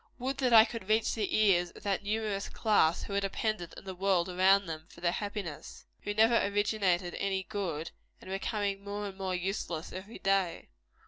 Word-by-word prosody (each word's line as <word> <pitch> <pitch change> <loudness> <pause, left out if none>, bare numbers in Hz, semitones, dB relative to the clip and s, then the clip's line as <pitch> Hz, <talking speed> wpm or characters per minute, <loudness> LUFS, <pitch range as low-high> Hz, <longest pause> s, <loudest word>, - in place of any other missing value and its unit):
Would 265 +2 -3
that 255 -3 +2
I 225 -1 +9
could 225 -4 -7
reach 220 +1 +3
the 215 -3 0
ears 185 -5 +4
of - - -15
that 200 0 0
numerous 210 -1 -2
class 205 -7 +2
who 200 - -6
are 200 - +2
dependent 195 -2 -2
on - - -10
the 190 -1 -6
world 185 -1 +1
around 190 +2 +4
them 160 -1 -6
for - - -15
their 175 0 +1
happiness 200 -5 -5
who 205 - -4
never 225 +2 +5
originated 200 -3 +1
any 195 -1 -1
good, 180 -7 -4 0.3
and - - -14
are 190 - -4
becoming 200 -1 -2
more 205 +1 -4
and 195 -1 -6
more 190 -1 -2
useless 180 -3 -3
everyday! 195 -2 -1
195 Hz, 190 wpm, -31 LUFS, 180-210 Hz, 0.3 s, I